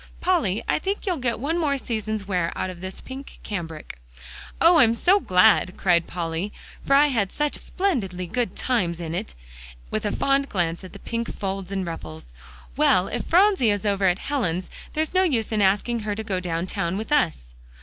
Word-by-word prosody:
"Polly, 225 - +1
I - - +2
think 390 +5 -3
you'll 365 -4 0
get 245 -4 -1
one 320 +7 -1
more 290 -4 +1
season's 215 -4 -3
wear 180 -4 0
out 185 - -2
of 175 -1 -12
this 185 0 -6
pink 265 +1 -9
cambric." 165 - -6 0.6
"Oh! 335 +1 +7
I - - +8
am 230 -1 +3
so 370 - +4
glad," 185 - +4
cried 170 -3 +2
Polly, 170 +3 -3 0.3
"for 275 - +3
I 290 +1 +6
had 210 -8 0
such 295 -1 -1
splendidly 215 - -2
good 235 +7 -2
times 180 -10 0
in 165 -1 -4
it," 60 - -4 0.6
with - - -1
a 205 - 0
fond 275 +4 +1
glance 170 -2 -1
at 185 - -10
the - - -7
pink 230 -1 -4
folds 195 -1 -4
and 195 -1 -2
ruffles. 80 - -8 0.4
"Well, 185 0 +3
if - - -2
Phronsie 370 - +4
is 205 0 0
over 200 -1 +1
at 180 0 +2
Helen's, 190 - -2 0.2
there's 315 +2 -1
no 370 - +4
use 255 - +1
in 215 -1 +1
asking 205 +5 +2
her 210 -1 -3
to 220 - -4
go 195 -4 -2
down 170 -1 -2
town 175 0 -2
with 220 +6 -5
us." 160 - +1
205 Hz, 200 wpm, -24 LUFS, 180-275 Hz, 0.6 s, I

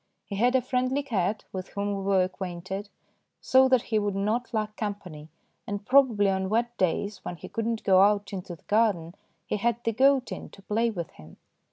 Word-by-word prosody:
He 200 - -6
had 245 +4 +3
a 255 - +3
friendly 255 +2 0
cat, 210 -5 -1
with 185 -1 -5
whom 200 0 -2
we 195 - -4
were 195 -1 +3
acquainted, 185 +2 -5 0.5
so 260 0 +4
that 255 -2 +4
he 215 - +4
would 205 -1 -1
not 215 +5 -1
lack 215 -2 -2
com 210 -3 -2
pany, 155 -6 -11 0.4
and 205 0 -4
probably 250 -6 +4
on 190 -1 0
wet 235 +3 0
days 185 +2 -1
when 175 - -5
he - - -10
could 225 0 -3
not 230 -1 -2
go 190 -1 +5
out 205 +1 +2
into 185 -2 -5
the - - -25
garden 205 -7 +1 0.3
he - - -2
had 235 +3 0
the 230 - +1
goat 265 +1 +3
in - - -6
to 195 - -16
play 225 +4 +1
with 175 -7 -5
him. 80 +1 -15
205 Hz, 210 wpm, -27 LUFS, 190-235 Hz, 0.5 s, go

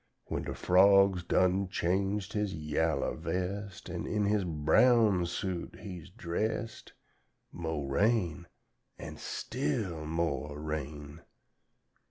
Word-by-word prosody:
"When - - -3
da - - -3
frog's 95 0 +5
done 95 +2 +2
changed 95 +3 -1
his 105 -2 -1
yaller 75 -1 0
vest, 90 +4 -4
An' - - -4
in 105 -1 0
his 105 0 +2
brown 90 +4 +4
suit 90 0 -4
he 95 -3 -7
is 90 - -13
dressed, 110 +4 -3 0.6
Mo' 80 -3 -3
rain, 85 +3 +1 0.5
an' - - -8
still 80 +1 -3
mo' 80 -3 -1
rain! 75 0 -5
90 Hz, 110 wpm, -31 LUFS, 80-100 Hz, 0.6 s, frog's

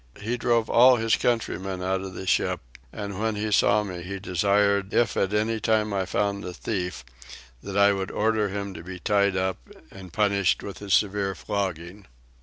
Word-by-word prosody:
He 115 +4 -2
drove 120 -2 +1
all 125 +2 +6
his 115 -1 +2
countrymen 95 -6 -2
out 95 0 0
of 95 -1 -7
the 95 - -6
ship; - - +1 0.3
and 100 -2 -6
when 110 0 0
he 105 +1 -2
saw 105 +1 +4
me 90 -4 -6
he 95 +3 -5
desired 100 +2 +1
if 120 -3 +2
at 95 - 0
any 110 +2 0
time 110 -2 +1
I 95 -2 -1
found 100 +1 -1
a 90 -1 -6
thief 90 - -4 0.6
that 100 0 -5
I 100 0 +5
would 95 0 -3
order 110 -1 0
him 100 0 -4
to 80 -1 -9
be 90 +1 -7
tied 100 +1 +1
up 95 0 -1 0.3
and 95 -2 -11
punished 100 0 +1
with 100 - -8
a 100 - -8
severe 100 0 +1
flogging. 95 0 -4
100 Hz, 190 wpm, -25 LUFS, 95-105 Hz, 0.6 s, all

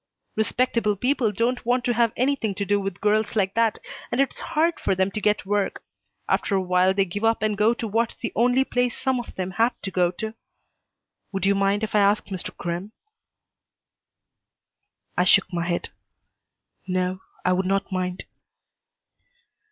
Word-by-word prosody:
"Respectable 220 -1 +1
people 245 +1 +1
don't 235 +4 0
want 245 +1 +1
to 245 - +2
have 230 -1 +3
anything 255 -6 0
to 200 - -2
do 205 +1 +2
with 195 -2 -4
girls 215 +1 +1
like 195 -2 +1
that, 230 -2 +2 0.3
and 240 - -1
it's 275 - +1
hard 330 +1 0
for - - 0
them 190 +1 +1
to 215 - -4
get 210 -2 +1
work. 205 0 -1 0.4
After 200 - +1
a - - +3
while 180 +1 +3
they 195 -1 +3
give 200 +4 -5
up 225 -1 +2
and 215 -1 +1
go 215 +3 +3
to 230 - -4
what's 225 +2 0
the 230 - -4
only 245 +3 +3
place 245 -2 -1
some 260 -2 0
of 240 - -8
them 185 0 -3
have 230 +5 +1
to 195 - -3
go 180 -2 +2
to. 220 +5 -5 1.0
Would 195 0 -1
you 200 - +4
mind 200 +2 +1
if 220 - -3
I 210 - +4
ask 205 +1 +3
Mr. 190 -2 -4
Crimm?" 175 +5 -4 2.2
I 180 - +3
shook 190 0 +4
my 170 -1 -1
head. 175 -1 -1 1.0
"No, 185 0 -1 0.2
I 185 - +4
would 185 +1 0
not 195 +1 0
mind." 185 0 -2
205 Hz, 175 wpm, -24 LUFS, 190-235 Hz, 2.2 s, you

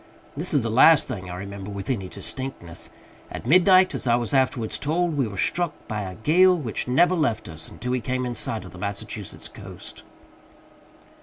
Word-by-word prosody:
This 160 +6 -3
is 145 -6 +3
the 115 - -1
last 145 +6 +6
thing 95 -8 -5
I 90 - -5
remember 100 +1 -7
with 100 -1 -6
any 100 -8 -2
distinctness. 100 -4 -5 0.4
At - - -7
midnight, 185 +5 +6
as - - -3
I 120 - +5
was 120 +2 -2
afterwards 130 -4 +1
told, 165 +2 0
we 135 -5 +1
were 100 -2 -8
struck 175 - 0
by 105 -2 -3
a 95 -2 -6
gale 180 - +4
which 125 -9 -3
never 170 +8 +4
left 130 -11 0
us 80 -2 -6
until 125 - -5
we 125 -1 0
came 130 +2 -2
in 120 - -3
sight 110 -2 -2
of 90 - -10
the 90 - -12
Massachusetts 100 +1 -5
coast. - - -11
125 Hz, 190 wpm, -24 LUFS, 100-150 Hz, 0.4 s, last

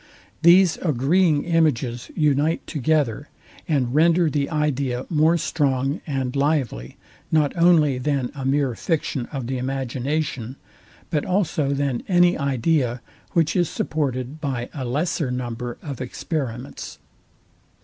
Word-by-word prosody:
These 175 +1 +6
agreeing 155 +2 +2
images 140 -8 0
unite 150 +1 +1
together, 145 -3 0 0.4
and 135 -7 0
render 165 +1 +4
the 140 -1 0
idea 140 -5 -1
more 160 +2 +4
strong 140 -2 0
and 135 -3 -2
lively, 140 - -1 0.3
not 150 -3 +2
only 165 -6 +4
than 135 -1 -1
a 140 -2 -6
mere 135 -1 +1
fiction 140 -2 -2
of 135 -4 -4
the 130 +1 -3
imagination, 130 0 -2 0.6
but 150 -2 +1
also 180 -6 0
than 135 -3 -1
any 175 -1 +4
idea, 135 -2 0 0.3
which 165 -2 +2
is 175 -3 +2
supported 140 -1 -3
by 130 -4 -3
a 135 -3 -4
lesser 150 +3 -1
number 120 -1 -4
of 140 -5 -6
experiments. 130 -1 -5
140 Hz, 120 wpm, -23 LUFS, 130-160 Hz, 0.6 s, These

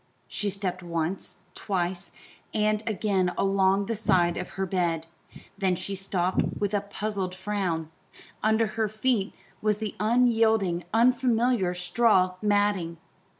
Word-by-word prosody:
She 205 - -1
stepped 190 -2 -3
once, 170 +1 -3
twice, 180 -2 -2 0.4
and 215 0 +2
again 195 -4 +1
along 195 0 +2
the 230 - -2
side 185 -5 +2
of 180 - -5
her 190 - 0
bed; 170 -3 -1 0.5
then 190 -2 +2
she 195 - -4
stopped 190 -1 0 0.2
with 205 0 -1
a 205 - +2
puzzled 200 -2 -4
frown 185 -5 -2 0.5
under 220 +1 +3
her 220 0 -1
feet 215 -1 0 0.3
was 210 -1 +1
the 215 -1 -4
unyielding, 220 -5 +2
unfamiliar 235 -4 +2
straw 185 +1 +3
matting. 205 -5 +1
195 Hz, 125 wpm, -27 LUFS, 180-215 Hz, 0.5 s, under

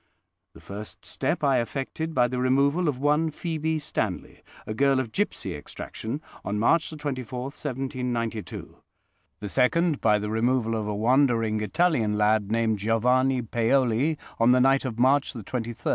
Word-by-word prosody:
The - - -14
first 105 +2 -9
step - - -2
I 135 -3 +3
effected 140 +7 -4
by 125 -1 +4
the 125 +1 -3
removal 140 +7 +2
of 145 -4 0
one 150 +4 +2
Phoebe 160 0 -2
Stanley, 110 -11 -4 0.2
a 110 - -4
girl 135 +3 +3
of 125 -4 -3
gipsy 150 - -2
extraction, 110 - -6 0.2
on 105 - -2
March 155 +9 +2
24, 135 -5 -5
1792. 125 -5 -4 0.6
The 105 - -4
second, 150 - +2
by 105 -2 +4
the 105 0 -4
removal 115 +1 +1
of 110 -2 -2
a 105 - -2
wandering 115 -2 +2
Italian 120 -5 +1
lad, 105 -1 +2
named 115 -2 +1
Giovanni 125 +4 +2
Paoli, 120 +5 +1 0.2
on 115 +2 +5
the 125 - +4
night 135 +1 +3
of 120 -3 -4
March 135 +4 +3
23, 115 -5 -7 0.2
1805. 115 0 -5
125 Hz, 155 wpm, -26 LUFS, 110-140 Hz, 0.6 s, on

